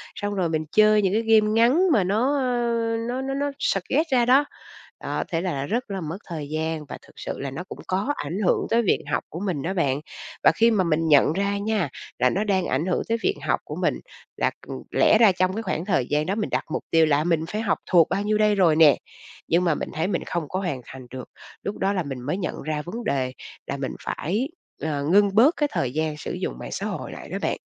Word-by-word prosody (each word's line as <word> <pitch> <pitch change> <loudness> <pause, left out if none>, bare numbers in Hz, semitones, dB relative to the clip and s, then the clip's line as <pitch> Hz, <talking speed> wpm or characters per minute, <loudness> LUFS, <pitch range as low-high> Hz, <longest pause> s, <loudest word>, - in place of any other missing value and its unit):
xong 205 0 -3
rồi 180 -4 0
mình 155 -1 -1
chơi 215 0 +5
những 190 -1 +1
cái 220 - +2
game 220 -1 +4
ngắn 255 - +4
mà 205 - +4
nó, 230 +10 +1
ờ, 245 -3 0 0.4
nó 255 +2 -2
nó 270 0 -3
nó 285 +1 -1
suggest 265 - 0
ra 245 -2 +4
đó. 270 +4 +5 0.6
Đó, - - -2
thế 165 -1 -1
là 145 -7 -2
rất 230 - -2
là 195 -1 -3
mất 160 +2 -4
thời 155 -4 -5
gian 155 0 -2
và - - -8
thực - - -20
sự - - -5
là 140 -1 -4
nó 135 +7 -5
cũng - - -8
có 195 +10 0
ảnh 165 +7 -4
hưởng - - +2
tới 230 +1 +3
việc 210 - +1
học - - 0
của 165 - -6
mình 180 -8 -2
đó 185 +6 -2
bạn. 145 -6 0 0.4
Và - - +7
khi 230 +4 +4
mà 195 -4 +2
mình 165 -1 +1
nhận 150 0 +5
ra 200 +2 0
nha, 205 -6 0 0.3
là 125 +1 +4
nó 195 +10 0
đang 190 -4 +1
ảnh 140 +6 0
hưởng 185 - 0
tới 230 - +2
việc 400 - +2
học - - +1
của - - -7
mình, - - 0 0.4
là, - - +1 0.2
ừm, - - -5
lẽ - - +5
ra 220 -3 +6
trong 185 0 0
cái 225 +3 -3
khoảng 185 -3 -2
thời 135 -11 +1
gian 150 +1 +1
đó 195 +5 -1
mình 215 - -2
đặt - - -1
mục - - -2
tiêu 165 -1 +5
là 150 0 +2
mình 165 -2 +1
phải 215 +4 -3
học 225 - +1
thuộc 170 -4 +6
bao 200 - 0
nhiêu 210 0 +1
đây 210 -1 +3
rồi 175 -5 +4
nè 155 -3 +6 0.5
nhưng 170 +2 +3
mà 165 -3 +2
mình - - -4
thấy 160 +3 -1
mình 190 - -1
không 170 -4 -3
có 185 - -2
hoàn 170 -10 -3
thành 130 -2 -11
được. 130 -1 -8 0.3
Lúc 200 - -4
đó 195 +1 +1
là 185 -3 -1
mình 135 -4 -6
mới 150 +9 -2
nhận 180 -4 -4
ra 155 0 -2
vấn 220 +10 -6
đề 130 -2 -1 0.3
là 140 - -3
mình 135 -1 -4
phải, 215 - -2 0.3
ờ, 145 -1 -2
ngưng 200 0 +4
bớt 270 +10 +6
cái 295 -1 +1
thời 125 - -1
gian 155 0 -1
sử - - -5
dụng - - -4
mạng - - -7
xã - - -3
hội - - -4
lại - - -9
đó - - -3
bạn. - - -1
185 Hz, 255 wpm, -24 LUFS, 155-215 Hz, 0.6 s, Và